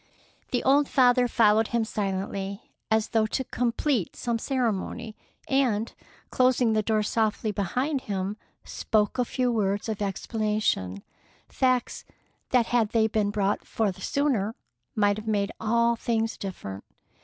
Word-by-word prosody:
The 245 - -1
old 280 +2 +4
father 250 -1 +4
followed 220 -2 +4
him 235 -1 0
silently, 195 -1 -4 0.2
as 220 -1 +2
though 220 -2 +2
to 265 - -2
complete 245 - -1
some 235 -1 -2
ceremony, 235 -3 -2 0.3
and, 240 -5 +1 0.4
closing 255 -3 +3
the 215 - +2
door 215 0 +1
softly 220 0 0
behind 255 - -1
him, 195 -1 -3 0.3
spoke 215 +2 0
a 250 - +3
few 250 0 0
words 205 -2 0
of 215 -2 -3
explanation, 205 - -1 0.5
facts 255 -2 0 0.5
that 245 -2 +3
had 230 -3 +1
they 225 -1 +4
been 215 -2 +1
brought 205 -1 0
forth 205 -5 -2
sooner 245 -7 0 0.4
might 205 -2 +2
have 215 +1 -8
made 205 -1 0
all 235 +1 +2
things 225 -1 -1
different. 100 - -7
220 Hz, 135 wpm, -26 LUFS, 205-245 Hz, 0.5 s, old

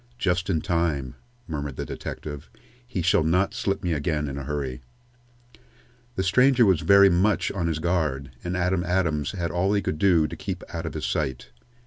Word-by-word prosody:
"Just 90 -1 0
in 80 -5 +1
time," 80 -8 -1 0.3
murmured 70 -4 -4
the - - -4
detective. 75 -2 -7 0.4
"He 95 -8 -3
shall 85 -2 +3
not 90 +5 +2
slip 105 -5 -2
me 90 -2 0
again 75 0 -1
in 70 - -5
a 70 -1 -5
hurry." 70 -4 -3 1.3
The 95 - 0
stranger 125 +6 +4
was 95 -5 +3
very 100 0 +7
much 95 +4 +2
on 90 -4 -2
his 80 -2 -1
guard, 80 -6 -1
and 90 +1 -2
Adam 90 0 +1
Adams 85 -5 0
had 85 -4 -2
all 95 +3 +1
he 100 - +2
could 75 - -2
do 85 -5 +4
to - - -5
keep 95 -2 -5
out 80 -1 -4
of 80 - -6
his 75 0 -3
sight. 65 -4 -2
85 Hz, 185 wpm, -25 LUFS, 75-95 Hz, 1.3 s, very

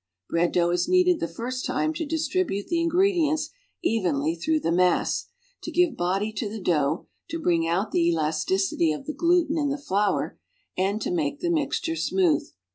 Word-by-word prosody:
Bread 170 +1 +2
dough 175 -1 +2
is 175 0 +1
kneaded 365 -1 +4
the 165 - -1
first 250 +9 -5
time 315 - 0
to 320 -1 -4
distribute 320 - -1
the 340 -1 +1
in 335 - +1
gredients 330 -4 +2 0.3
evenly 170 - +1
through 310 - 0
the 165 - 0
mass, 180 +1 +2 0.3
to - - -6
gi\'e 355 -2 +3
body 195 +4 -1
to 210 -1 -2
the 220 +1 -6
dough, 155 -4 0 0.2
to 330 0 -3
Ijring 165 - +1
out 190 +5 0
the 170 -1 +2
elasticity 160 +2 +1
of 150 - -5
the 305 - -4
gluten 335 -2 +2
in 290 -1 +1
the 280 - -1
flour 205 -7 -1 0.4
and 195 +3 0
to - - -2
make 295 -4 -1
the 345 -1 0
mixture 320 +1 -1
smooth. 345 -2 +1
230 Hz, 185 wpm, -25 LUFS, -, 0.4 s, kneaded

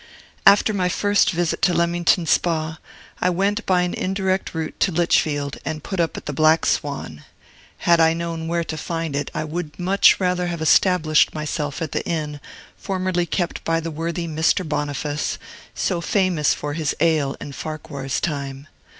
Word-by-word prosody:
After 205 +2 +6
my 185 -3 +1
first 205 +2 +2
visit 175 -1 -1
to 180 -1 +3
Leamington 170 +1 +2
Spa, 160 -1 0 0.4
I 180 - +3
went 200 +4 0
by 180 -1 +3
an 180 - -2
indirect 190 -1 -1
route 160 -1 -3
to 190 - +2
Lichfield, 150 -4 +1
and 155 -1 -4
put 190 - -4
up 165 -1 0
at - - -8
the 150 - -4
Black 155 +3 +4
Swan. 135 - -2 0.6
Had 170 -1 +5
I 160 0 +5
known 165 -1 -4
where 170 0 0
to 160 -1 -5
find 165 -1 -3
it, 145 0 -2
I 155 - -1
would 155 0 -5
much 190 +2 +4
rather 180 -1 0
have 170 -1 -3
established 160 -1 +3
myself 150 0 -3
at 155 - -5
the - - -2
inn 150 -3 -3 0.4
formerly 185 -2 -1
kept 175 -1 -2
by 165 0 +1
the 165 0 -5
worthy 170 +2 -3
Mr. 160 +3 +1
Boniface, 145 0 -2 0.4
so 175 -2 -1
famous 180 -5 +1
for 145 0 -4
his 155 -1 -1
ale 155 -5 +1
in 145 - -7
Farquhar's 140 -3 -4
time. 140 -3 -4
165 Hz, 170 wpm, -22 LUFS, 150-180 Hz, 0.6 s, After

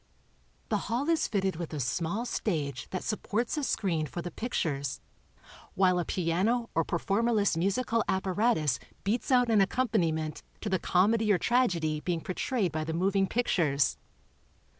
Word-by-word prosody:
The 215 - +2
hall 245 +6 0
is 330 -1 +2
fitted 190 -4 -1
with 165 -2 -5
a - - -3
small 170 - -1
stage 150 - -2
that 185 - -4
supports 225 +3 -1
a 300 - -2
screen 170 - 0
for 170 +5 -6
the 175 - -5
pictures, 145 - -2 0.8
while 185 -1 +3
a 175 - -1
piano 195 +8 0
or 165 - +2
performerless 205 +4 +1
musical 210 +6 +1
apparatus 190 - +1 0.2
beats 225 +7 -1
out 245 -2 +4
an 215 -3 +5
accompaniment 175 - 0 0.2
to 215 - -3
the 190 -2 +1
comedy 210 +5 +3
or 195 - +4
tragedy 175 -11 +1
being 170 +1 -2
portrayed 190 +1 -1
by 155 0 -2
the 160 +1 -3
moving 195 +2 +2
pictures. 165 - +1
190 Hz, 150 wpm, -29 LUFS, 165-230 Hz, 0.8 s, an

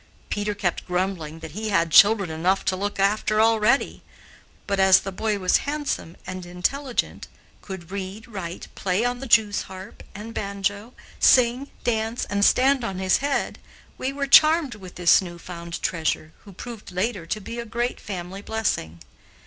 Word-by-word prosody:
Peter 205 0 -1
kept 180 -4 -2
grumbling 180 -4 -2
that 160 -1 -8
he 215 +6 -4
had 170 -5 +1
children 200 -3 +6
enough 175 +5 0
to 185 - +1
look 200 +1 -3
after 210 +2 +2
already, 225 +3 +2 0.6
but, 200 -1 -1
as 190 0 +6
the 195 - -5
boy 210 +2 -1
was 185 -2 +3
handsome 290 - -4
and 185 0 -6
intelligent, 235 +10 -2 0.3
could 190 -3 -9
read, 200 +3 -6
write, 190 -6 -7
play 195 +4 0
on 245 0 -1
the 270 - -6
jewsharp 205 -4 0
and 215 +3 -8
banjo, 200 +3 -3 0.2
sing, 250 +2 +4 0.2
dance, 225 0 -1
and 200 0 +1
stand 265 +3 +4
on 195 -5 -3
his 185 0 +2
head, 285 0 -2 0.4
we 260 - -1
were 280 0 -2
charmed 310 0 +6
with 190 -4 -11
this 175 +1 +5
new 175 -2 -8
found 170 -1 -7
treasure, 160 -1 -1
who 200 - -12
proved 220 +2 -9
later 185 -1 -2
to 215 - -2
be 230 +4 -7
a - - -3
great 240 +3 -2
family 190 0 -6
blessing. 205 - -2
200 Hz, 165 wpm, -24 LUFS, 180-230 Hz, 0.6 s, children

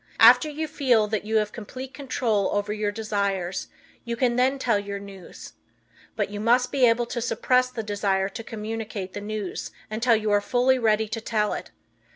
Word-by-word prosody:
After 250 +6 +7
you 310 +1 -3
feel 245 -8 +2
that 210 -1 -2
you 220 +1 -2
have 210 -1 +2
complete 255 +4 -8
control 240 -7 0
over 205 +1 -1
your 210 -1 -1
desires 200 -4 -2 0.4
you 235 0 -3
can 240 0 +1
then 260 +2 +2
tell 235 -6 +1
your 200 0 -5
news. 200 -2 -11 0.6
But - - -1
you 205 - -5
must 240 +3 +3
be 260 -3 +4
able 235 +1 +2
to 240 0 -4
suppress 255 +1 +2
the 235 -3 -5
desire 200 -2 0
to 225 +4 -7
communicate 215 -3 -5
the 205 - -5
news 210 -2 -4 0.2
until 230 +2 +3
you 215 -1 0
are 205 0 +4
fully 250 +4 +2
ready 220 -1 +2
to 225 +1 -4
tell 215 -1 0
it. - - -6
220 Hz, 190 wpm, -25 LUFS, 205-245 Hz, 0.6 s, After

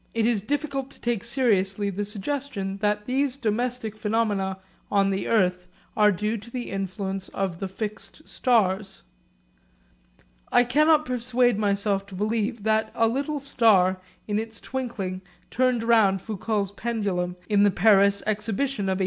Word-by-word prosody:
It 225 -1 +2
is 230 -3 +2
difficult 275 +2 -2
to - - -14
take 235 -4 -1
seriously 205 -5 +1
the 200 +2 -3
suggestion 210 -1 -4
that 210 0 0
these 265 +2 0
domestic 235 -1 -2
phenomena 210 -3 0 0.3
on 195 -1 +2
the 195 - -2
earth 180 -4 +1 0.3
are 210 -1 +5
due 210 +4 -1
to 220 +3 -11
the 245 0 -5
influence 195 0 -4
of 190 -3 -2
the 195 - -3
fixed 210 +6 -7
stars. 195 -5 0 1.5
I 245 - +6
cannot 305 +5 +3
persuade 245 -2 +1
myself 200 -1 +1
to 195 - -10
believe 215 +2 -1
that 220 0 +1
a 225 - +3
little 280 +5 -1
star 205 -9 +3 0.3
in 210 0 0
its 225 0 -6
twinkling 210 -8 -4 0.3
turned 250 -2 +1
round 220 -5 +4
Foucault's 205 0 -2
pendulum 200 -5 -2
in 205 -1 +3
the 205 - +6
Paris 200 +1 +4
Exhibition 215 +3 -1
of 190 - 0
1861. - - -6
215 Hz, 150 wpm, -25 LUFS, 195-240 Hz, 1.5 s, I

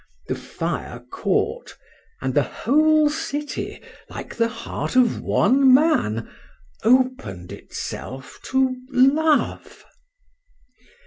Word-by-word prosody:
—The - - +1
fire - - -5
caught—and 460 -1 -3
the - - +4
whole 310 +3 +3
city, 295 -1 -4 0.3
like - - -8
the 230 -1 +1
heart 230 +2 -5
of 250 -3 +3
one 265 +5 +4
man, 255 - +3 0.6
open'd 240 - +1
itself 130 +1 -7
to 265 -1 +1
Love. 285 +4 +2
265 Hz, 85 wpm, -22 LUFS, 235-305 Hz, 0.6 s, the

